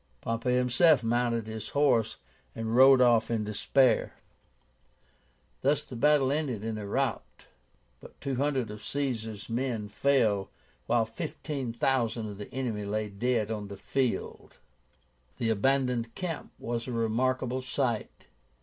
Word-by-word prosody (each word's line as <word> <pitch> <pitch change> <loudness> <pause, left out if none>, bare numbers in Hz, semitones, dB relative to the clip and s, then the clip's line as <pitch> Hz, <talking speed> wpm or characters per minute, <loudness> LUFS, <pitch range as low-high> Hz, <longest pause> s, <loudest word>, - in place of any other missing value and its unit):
Pompey 115 - -1
himself 125 +3 +4
mounted 115 -1 0
his 110 -1 -6
horse 135 -7 +3 0.4
and 115 0 -2
rode 130 0 +8
off 120 -3 +4
in 115 -2 0
despair. 120 +5 +2 1.5
Thus 145 +2 +1
the 125 - -9
battle 140 +1 +3
ended 140 -8 -2
in 110 -1 -3
a 105 - -6
rout. 135 +3 -2 0.5
But - - -15
two 135 -2 -3
hundred 135 -5 0
of 105 0 -9
Caesar's 110 -5 -3
men 115 -3 -2
fell, 105 -4 +2 0.4
while 115 -1 +3
fifteen 140 0 -5
thousand 115 -3 0
of 100 - -10
the 105 - -8
enemy 120 -5 -3
lay 105 +1 -2
dead 110 +1 0
on 105 -2 -4
the 100 0 -8
field. 130 +3 -2 0.8
The 115 -2 0
abandoned 125 0 +1
camp 175 -4 -5
was 120 0 -4
a - - -4
remarkable 125 +3 0
sight. 125 -3 -2
120 Hz, 135 wpm, -29 LUFS, 110-135 Hz, 1.5 s, rode